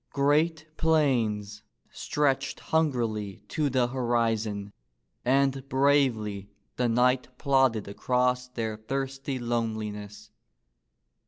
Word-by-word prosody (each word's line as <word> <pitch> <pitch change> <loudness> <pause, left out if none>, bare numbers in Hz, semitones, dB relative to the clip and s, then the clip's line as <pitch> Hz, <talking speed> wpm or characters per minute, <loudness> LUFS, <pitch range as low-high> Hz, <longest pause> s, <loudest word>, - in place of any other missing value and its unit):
Great 155 +3 +2
plains 115 -10 +1 0.3
stretched 135 -2 -1
hungrily 115 -10 -1
to 150 +2 0
the 130 -2 +2
horizon, 115 -5 -1 0.5
and 135 +1 +1
bravely 130 -8 +2 0.3
the 125 -1 +1
knight 125 +2 +2
plodded 130 -7 +2
across 125 +4 0
their 115 -3 -4
thirsty 135 +3 -3
loneliness. 105 -3 -4
125 Hz, 85 wpm, -27 LUFS, 110-135 Hz, 0.5 s, Great